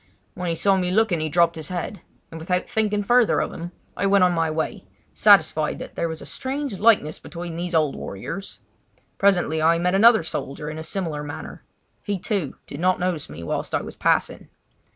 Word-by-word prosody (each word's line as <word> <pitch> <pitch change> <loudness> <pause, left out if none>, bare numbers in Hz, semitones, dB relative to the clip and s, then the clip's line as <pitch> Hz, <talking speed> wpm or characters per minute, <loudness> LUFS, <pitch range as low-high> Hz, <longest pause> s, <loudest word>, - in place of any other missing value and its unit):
When 180 -1 -4
he 165 - 0
saw 195 +3 +3
me 180 -1 0
looking 200 -3 +2
he 155 0 -2
dropped 170 +2 +3
his 160 -2 -5
head; 180 +1 -4 0.3
and 165 - -7
without 180 +3 -1
thinking 210 -2 0
further 240 +2 +4
of - - -2
him 170 +1 -7 0.2
I 200 - 0
went 195 -1 +4
on 180 - +4
my 165 -2 +1
way, 155 0 -3 0.3
satisfied - - +4
that - - -8
there 170 - -2
was 160 0 -6
a - - -10
strange 265 -5 -4
likeness 205 -9 +3
between 170 +1 -7
these 175 0 -3
old 155 -3 +2
warriors. 190 - -6 0.6
Presently 175 -5 +2
I 165 +1 +4
met 180 +2 +1
another 220 +2 +6
old - - -10
soldier 150 -1 -4
in 155 - -7
a - - -5
similar 165 -5 -3
manner. 145 0 -8 0.4
He, 205 -2 -2
too, 185 - -2
did 140 - -8
not 185 +2 +2
notice 180 -4 -2
me 75 +3 -8
whilst 85 - -2
I - - -1
was - - -9
passing. - - 0
175 Hz, 205 wpm, -23 LUFS, 160-195 Hz, 0.6 s, another